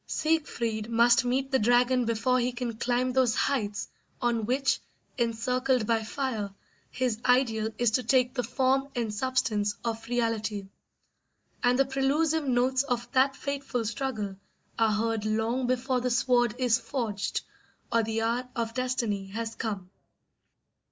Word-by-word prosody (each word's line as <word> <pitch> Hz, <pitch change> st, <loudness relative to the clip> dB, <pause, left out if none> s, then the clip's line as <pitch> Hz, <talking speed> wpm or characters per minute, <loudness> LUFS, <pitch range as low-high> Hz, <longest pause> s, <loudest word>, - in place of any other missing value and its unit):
Siegfried 235 Hz, -9 st, -1 dB
must 235 Hz, +1 st, +4 dB
meet 265 Hz, +2 st, 0 dB
the 265 Hz, -, +3 dB
dragon 245 Hz, +2 st, +3 dB
before 230 Hz, +3 st, +1 dB
he 245 Hz, +1 st, 0 dB
can 240 Hz, -2 st, -4 dB
climb 250 Hz, +2 st, 0 dB
those 255 Hz, -3 st, +3 dB
heights 210 Hz, -8 st, -1 dB, 0.3 s
on 235 Hz, -3 st, 0 dB
which, 270 Hz, +2 st, +1 dB, 0.4 s
encircled 250 Hz, +1 st, +1 dB
by 225 Hz, 0 st, +1 dB
fire, 220 Hz, -3 st, -3 dB, 0.4 s
his 250 Hz, -4 st, -1 dB
ideal 240 Hz, -4 st, +2 dB
is 240 Hz, -2 st, +2 dB
to 255 Hz, -, +2 dB
take 250 Hz, +1 st, +2 dB
the 255 Hz, -, 0 dB
form 260 Hz, +2 st, +1 dB
and 230 Hz, -3 st, -1 dB
substance 210 Hz, -4 st, 0 dB
of 225 Hz, -1 st, -3 dB
reality; 225 Hz, -4 st, -1 dB, 1.0 s
and 245 Hz, 0 st, +4 dB
the 275 Hz, -, +4 dB
prelusive 285 Hz, +3 st, +1 dB
notes 255 Hz, +1 st, +2 dB
of 245 Hz, -3 st, -3 dB
that 270 Hz, +1 st, +3 dB
fateful 275 Hz, -5 st, -3 dB
struggle 220 Hz, -4 st, -3 dB, 0.4 s
are 225 Hz, -1 st, +4 dB
heard 225 Hz, 0 st, 0 dB
long 225 Hz, +4 st, 0 dB
before 255 Hz, 0 st, 0 dB
the 250 Hz, -, 0 dB
sword 240 Hz, -1 st, +2 dB
is 245 Hz, -3 st, +3 dB
forged 215 Hz, -8 st, -2 dB, 0.5 s
or 230 Hz, -, +4 dB
the 225 Hz, 0 st, -1 dB
hour 240 Hz, +2 st, -1 dB
of 230 Hz, -2 st, -2 dB
destiny 235 Hz, -6 st, -1 dB
has 225 Hz, +3 st, -4 dB
come. 200 Hz, -6 st, -4 dB
240 Hz, 145 wpm, -28 LUFS, 225-255 Hz, 1.0 s, must